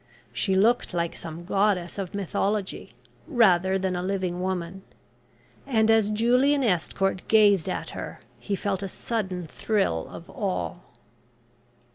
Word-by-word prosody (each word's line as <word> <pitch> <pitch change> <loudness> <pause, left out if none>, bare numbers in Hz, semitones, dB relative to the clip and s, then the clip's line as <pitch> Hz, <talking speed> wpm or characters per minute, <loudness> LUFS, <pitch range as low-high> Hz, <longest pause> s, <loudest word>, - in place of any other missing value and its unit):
She 190 -2 +1
looked 220 0 +2
like 170 -1 -1
some 165 +1 -8
goddess 195 -2 +1
of 195 0 -4
mythology, 200 +1 -2 0.3
rather 190 - +4
than 190 -1 -1
a 180 - -2
living 185 -1 -2
woman, 185 0 -3 0.9
and 225 -4 +3
as 220 -2 +4
Julian 250 +6 +3
Estcourt 195 -2 0
gazed 205 -5 +5
at - - -4
her - - -7 0.2
he 200 - -2
felt 195 -1 -2
a 195 - -3
sudden 190 -3 -3
thrill 175 - -1
of 170 - -10
awe. 195 -6 -3
195 Hz, 130 wpm, -26 LUFS, 180-215 Hz, 0.9 s, gazed